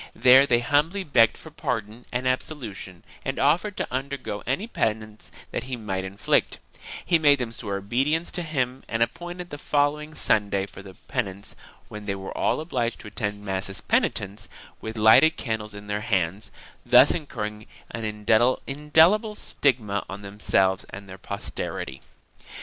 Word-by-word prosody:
There 130 Hz, +3 st, +7 dB
they 120 Hz, -2 st, +3 dB
humbly 150 Hz, +10 st, +1 dB
begged 115 Hz, -8 st, +4 dB
for 160 Hz, -, -12 dB
pardon 115 Hz, -5 st, -4 dB
and 125 Hz, +1 st, -1 dB
absolution 115 Hz, -, -4 dB, 0.2 s
and 135 Hz, -, -3 dB
offered 170 Hz, +9 st, +2 dB
to -, -, -3 dB
undergo 135 Hz, -5 st, -3 dB
any 135 Hz, -, 0 dB
penance 110 Hz, -, -3 dB, 0.2 s
that -, -, -3 dB
he 130 Hz, -1 st, -4 dB
might 100 Hz, -5 st, -3 dB
inflict; 95 Hz, +2 st, 0 dB, 0.5 s
he 170 Hz, -2 st, +4 dB
made 145 Hz, -2 st, +5 dB
them 125 Hz, -3 st, -3 dB
swear 100 Hz, -4 st, -3 dB
obedience 135 Hz, -, 0 dB
to 180 Hz, -, -2 dB
him 130 Hz, -5 st, -2 dB
and 115 Hz, 0 st, +2 dB
appointed 175 Hz, +8 st, -6 dB
the 145 Hz, -, -6 dB
following 150 Hz, +1 st, 0 dB
Sunday 100 Hz, -2 st, +1 dB
for 100 Hz, -, -12 dB
the 95 Hz, -1 st, -12 dB
penance, 100 Hz, +1 st, -4 dB, 0.3 s
when 105 Hz, -1 st, -9 dB
they 100 Hz, -, -1 dB
were 95 Hz, 0 st, -7 dB
all -, -, +1 dB
obliged 125 Hz, -7 st, -2 dB
to 105 Hz, -, -9 dB
attend 105 Hz, 0 st, -4 dB
mass 95 Hz, 0 st, -2 dB
as 95 Hz, -, -4 dB
penitents, 100 Hz, +2 st, -1 dB, 0.3 s
with 110 Hz, 0 st, -6 dB
lighted 110 Hz, +9 st, +6 dB
candles 110 Hz, -3 st, -4 dB
in 100 Hz, 0 st, -9 dB
their 105 Hz, 0 st, -2 dB
hands, 95 Hz, -3 st, -1 dB, 0.3 s
thus 125 Hz, +3 st, +7 dB
incurring 105 Hz, -9 st, -4 dB, 0.2 s
an 115 Hz, -, -5 dB
indelible 145 Hz, -, +3 dB
stigma 110 Hz, -, +1 dB
on 100 Hz, +1 st, -7 dB
themselves 100 Hz, -2 st, +1 dB
and 100 Hz, +1 st, -10 dB
their 95 Hz, 0 st, -10 dB
posterity. 95 Hz, -8 st, -5 dB
115 Hz, 155 wpm, -25 LUFS, 100-145 Hz, 0.5 s, There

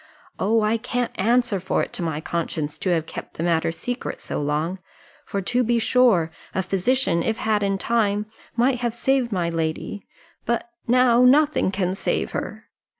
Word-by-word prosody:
Oh, 220 Hz, +3 st, +2 dB
I 215 Hz, +2 st, +2 dB
can't 245 Hz, +1 st, -2 dB
answer 235 Hz, 0 st, +2 dB
for 190 Hz, +1 st, 0 dB
it -, -, -7 dB
to -, -, -3 dB
my 160 Hz, -3 st, -2 dB
conscience, 160 Hz, -2 st, -3 dB
to 190 Hz, -, -1 dB
have 165 Hz, -3 st, +1 dB
kept -, -, -8 dB
the 165 Hz, -, -3 dB
matter 165 Hz, -1 st, +1 dB
secret 245 Hz, +9 st, -5 dB
so -, -, -3 dB
long; 155 Hz, +6 st, -1 dB, 0.5 s
for 200 Hz, -1 st, -2 dB
to 245 Hz, +6 st, +1 dB
be 235 Hz, 0 st, +2 dB
sure 225 Hz, -8 st, +3 dB, 0.2 s
a 190 Hz, -, +1 dB
physician, 190 Hz, 0 st, +1 dB
if 220 Hz, +5 st, -1 dB
had 215 Hz, -1 st, +1 dB
in 195 Hz, -1 st, +1 dB
time, 210 Hz, -1 st, +1 dB, 0.3 s
might 245 Hz, +1 st, +2 dB
have 240 Hz, -2 st, -1 dB
saved 260 Hz, -1 st, +1 dB
my 175 Hz, -4 st, 0 dB
lady 165 Hz, +4 st, -3 dB, 0.4 s
but 235 Hz, +1 st, -1 dB, 0.2 s
now 245 Hz, 0 st, +5 dB
nothing 290 Hz, -1 st, +4 dB
can 185 Hz, -2 st, -1 dB
save 195 Hz, -, -1 dB
her!" -, -, -5 dB
205 Hz, 175 wpm, -23 LUFS, 170-240 Hz, 0.5 s, now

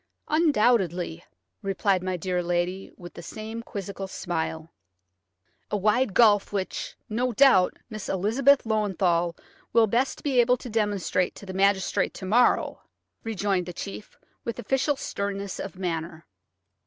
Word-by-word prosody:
"Undoubtedly," 210 Hz, -, +2 dB, 0.4 s
replied 195 Hz, -1 st, +1 dB
my 185 Hz, 0 st, -2 dB
dear 180 Hz, +1 st, -1 dB
lady, 175 Hz, +2 st, -2 dB
with 175 Hz, -1 st, -10 dB
the -, -, -9 dB
same 220 Hz, +6 st, -6 dB
quizzical 200 Hz, -3 st, -6 dB
smile. 160 Hz, -3 st, -4 dB, 1.0 s
"A 210 Hz, -, 0 dB
wide 210 Hz, +2 st, +2 dB
gulf 210 Hz, -4 st, +5 dB
which, 195 Hz, -2 st, -3 dB
no 245 Hz, +4 st, 0 dB
doubt, 230 Hz, -8 st, +5 dB
Miss 215 Hz, -3 st, -7 dB
Elizabeth 245 Hz, +9 st, +3 dB
Löwenthal 190 Hz, -6 st, +1 dB, 0.4 s
will 230 Hz, -1 st, +6 dB
best 240 Hz, +5 st, 0 dB
be 270 Hz, -4 st, +2 dB
able 250 Hz, +1 st, +3 dB
to 245 Hz, -1 st, -9 dB
demonstrate 205 Hz, -4 st, 0 dB
to -, -, -11 dB
the 190 Hz, -, -6 dB
magistrate 195 Hz, 0 st, +1 dB
to 190 Hz, -, -7 dB
morrow," 235 Hz, +6 st, +3 dB, 0.4 s
rejoined 200 Hz, -4 st, -1 dB
the 180 Hz, -, -5 dB
chief, 200 Hz, +3 st, -8 dB, 0.3 s
with 235 Hz, -, -4 dB
official 270 Hz, +5 st, +1 dB
sternness 200 Hz, -5 st, -4 dB
of 195 Hz, -1 st, -6 dB
manner. 165 Hz, -2 st, -4 dB
200 Hz, 135 wpm, -26 LUFS, 180-230 Hz, 1.0 s, will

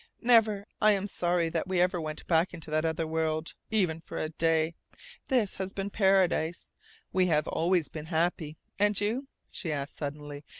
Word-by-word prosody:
"Never. 220 Hz, -4 st, +4 dB, 0.2 s
I 215 Hz, -1 st, +6 dB
am 195 Hz, -1 st, -1 dB
sorry 175 Hz, -3 st, 0 dB
that 165 Hz, +2 st, -2 dB
we 185 Hz, -1 st, 0 dB
ever 180 Hz, -1 st, +2 dB
went 155 Hz, -1 st, -6 dB
back 170 Hz, +1 st, +2 dB
into 160 Hz, -2 st, -10 dB
that 155 Hz, +1 st, +1 dB
other 160 Hz, 0 st, 0 dB
world, 160 Hz, 0 st, -1 dB, 0.2 s
even 180 Hz, -7 st, +1 dB
for -, -, -8 dB
a 155 Hz, -, -2 dB
day. 160 Hz, 0 st, +1 dB, 0.5 s
This 240 Hz, -7 st, +1 dB
has 190 Hz, +1 st, -4 dB
been 200 Hz, 0 st, -3 dB
paradise. 190 Hz, -5 st, +2 dB, 0.4 s
We 185 Hz, -1 st, +3 dB
have 150 Hz, -3 st, +2 dB
always 170 Hz, -1 st, +1 dB
been 155 Hz, -1 st, -8 dB
happy. 160 Hz, -2 st, -1 dB, 0.2 s
And 205 Hz, 0 st, +3 dB
you?" 230 Hz, +7 st, -1 dB, 0.2 s
she 170 Hz, -5 st, -4 dB
asked 140 Hz, -1 st, -4 dB
suddenly. 145 Hz, 0 st, -6 dB
170 Hz, 175 wpm, -29 LUFS, 160-195 Hz, 0.5 s, I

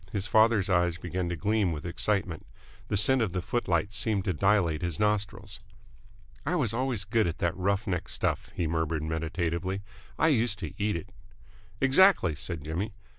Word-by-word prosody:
His 100 Hz, -4 st, -2 dB
father's 110 Hz, -2 st, +4 dB
eyes 90 Hz, -2 st, +2 dB
began 90 Hz, +1 st, -3 dB
to 85 Hz, -, -2 dB
gleam 100 Hz, +3 st, +1 dB
with 75 Hz, -1 st, -5 dB
excitement. 90 Hz, -2 st, -1 dB, 0.4 s
The 105 Hz, -, 0 dB
scent 130 Hz, +5 st, +4 dB
of 100 Hz, -6 st, -1 dB
the 90 Hz, -, -1 dB
footlights 100 Hz, -4 st, -1 dB
seemed 105 Hz, -2 st, 0 dB
to 95 Hz, -, +1 dB
dilate 90 Hz, -3 st, +2 dB
his 85 Hz, -3 st, -3 dB
nostrils. 105 Hz, -1 st, -1 dB, 0.8 s
"I 175 Hz, -, -1 dB
was 125 Hz, -, +1 dB
always 125 Hz, -4 st, -1 dB
good 110 Hz, 0 st, +2 dB
at 85 Hz, -, -3 dB
that 85 Hz, 0 st, 0 dB
rough 100 Hz, +3 st, 0 dB
neck 90 Hz, -4 st, -2 dB
stuff," -, -, -1 dB
he 85 Hz, -, -1 dB
murmured 80 Hz, -1 st, -1 dB
meditatively. 85 Hz, +4 st, -2 dB, 0.3 s
"I 160 Hz, -, +4 dB
used 115 Hz, -6 st, +2 dB
to -, -, -6 dB
eat 105 Hz, -1 st, +1 dB
it!" 85 Hz, -, -6 dB, 0.7 s
"Exactly," 135 Hz, -, +5 dB
said 75 Hz, +1 st, -4 dB
Jimmy. 90 Hz, +7 st, -3 dB
95 Hz, 175 wpm, -28 LUFS, 85-105 Hz, 0.8 s, Exactly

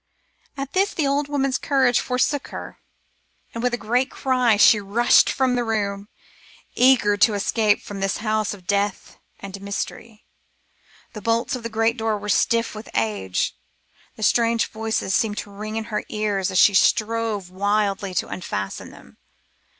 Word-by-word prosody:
At 275 Hz, 0 st, -5 dB
this 390 Hz, +2 st, +1 dB
the 310 Hz, -, 0 dB
old 280 Hz, +1 st, 0 dB
woman's 275 Hz, -2 st, 0 dB
courage 265 Hz, -4 st, +2 dB
forsook 255 Hz, +3 st, -1 dB
her, -, -, -9 dB, 0.7 s
and 230 Hz, -, -5 dB
with 250 Hz, 0 st, +1 dB
a 240 Hz, -, -1 dB
great 245 Hz, +4 st, 0 dB
cry 250 Hz, -5 st, +1 dB
she 210 Hz, +1 st, +6 dB
rushed 205 Hz, +4 st, +3 dB
from 260 Hz, -2 st, +1 dB
the 245 Hz, -1 st, 0 dB
room, 205 Hz, -3 st, -2 dB, 0.7 s
eager 245 Hz, -5 st, +4 dB
to 210 Hz, +1 st, +4 dB
escape 210 Hz, +1 st, +1 dB
from 200 Hz, -1 st, -7 dB
this 195 Hz, -1 st, -1 dB
house 215 Hz, -2 st, -1 dB
of 185 Hz, -3 st, -18 dB
death 200 Hz, 0 st, -2 dB, 0.2 s
and 200 Hz, 0 st, -8 dB
mystery. 210 Hz, +2 st, -6 dB, 0.9 s
The 215 Hz, -, -8 dB
bolts 230 Hz, +4 st, 0 dB
of 250 Hz, -, -6 dB
the 230 Hz, -, -5 dB
great 225 Hz, +2 st, 0 dB
door 220 Hz, -1 st, -1 dB
were 205 Hz, 0 st, -7 dB
stiff 230 Hz, +3 st, +1 dB
with 215 Hz, 0 st, -9 dB
age, 100 Hz, -5 st, -1 dB, 0.6 s
and 220 Hz, -, -1 dB
strange 230 Hz, 0 st, +2 dB
voices 220 Hz, -3 st, -2 dB
seemed 215 Hz, -3 st, +1 dB
to 205 Hz, -, -6 dB
ring 215 Hz, +2 st, -6 dB
in 225 Hz, -, -2 dB
her 210 Hz, -, -1 dB
ears 205 Hz, -3 st, -1 dB
as 190 Hz, -, -2 dB
she 200 Hz, -, +6 dB
strove 215 Hz, -2 st, +1 dB
wildly 200 Hz, 0 st, -1 dB
to -, -, 0 dB
unfasten 100 Hz, -, -5 dB
them. -, -, -17 dB
215 Hz, 165 wpm, -22 LUFS, 200-240 Hz, 0.9 s, she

